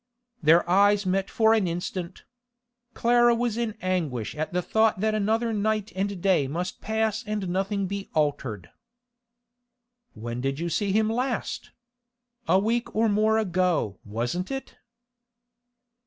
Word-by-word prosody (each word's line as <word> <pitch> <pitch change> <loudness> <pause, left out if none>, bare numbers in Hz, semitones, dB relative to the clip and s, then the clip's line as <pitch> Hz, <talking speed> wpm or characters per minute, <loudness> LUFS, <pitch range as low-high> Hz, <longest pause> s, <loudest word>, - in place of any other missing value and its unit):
Their 165 +3 +5
eyes 200 +2 +4
met 190 +1 0
for 220 -1 +3
an 215 -5 +2
instant. 175 +1 -5 0.7
Clara 240 0 +4
was 235 -2 -1
in 230 -2 -2
anguish 150 - -1
at 155 +1 -3
the 180 0 -1
thought 220 0 +2
that 215 +2 +1
another 220 +2 0
night 215 0 -1
and 195 0 -2
day 185 -8 +3
must 175 +6 -4
pass 220 0 -1
and 210 -3 -2
nothing 195 +2 -1
be 200 +1 -5
altered. 130 - -1 1.4
'When 120 +2 -5
did 135 +1 -1
you 170 +2 -2
see 200 +4 0
him 215 +2 +2
last? 245 +3 -2 0.8
A 185 - +5
week 230 +4 -1
or 225 +1 +3
more 215 +2 +3
ago, 180 - 0
wasn't 120 - -3
it? 270 0 -6
195 Hz, 140 wpm, -26 LUFS, 170-220 Hz, 1.4 s, Their